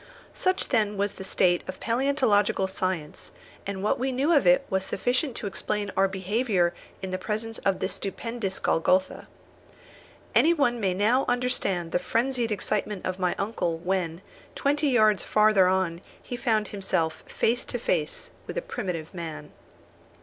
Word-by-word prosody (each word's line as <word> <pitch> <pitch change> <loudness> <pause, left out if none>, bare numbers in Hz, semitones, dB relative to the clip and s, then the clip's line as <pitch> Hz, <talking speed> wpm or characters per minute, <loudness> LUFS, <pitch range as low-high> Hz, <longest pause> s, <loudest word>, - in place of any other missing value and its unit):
Such 370 0 0
then 210 -4 +1
was 200 0 0
the 190 - -8
state 175 -2 +2
of 185 - -6
palæontological 230 -6 +2
science, 185 -5 -3 0.4
and 195 -1 -4
what 210 - +1
we 265 +1 0
knew 275 +6 +2
of 285 - +4
it 270 +1 +5
was 190 0 0
sufficient 250 +6 0
to - - -5
explain 205 0 -2
our 195 0 +4
behaviour 190 -1 0 0.3
in 190 - -3
the 185 - -2
presence 220 +3 -3
of 195 -1 +1
this 185 - -2
stupendous 200 +1 -4
Golgotha. 185 +3 +1 1.1
Any 335 +2 +5
one 245 -6 +2
may 190 -4 0
now 230 +7 +3
understand 205 -9 0
the - - +2
frenzied 235 +5 0
excitement 210 -1 -2
of 185 0 -3
my 180 -1 +1
uncle, 195 -5 -1
when, 175 0 -2 0.3
twenty 290 +2 +1
yards 215 -7 +4
farther 210 -3 +4
on, 185 -2 0 0.2
he 245 - -5
found 220 -5 0
himself 165 -5 -1
face 240 +2 0
to - - -3
face 165 -9 -2 0.2
with - - -5
a - - -1
primitive 165 -5 -4
man! 155 -4 -6
205 Hz, 155 wpm, -26 LUFS, 185-240 Hz, 1.1 s, it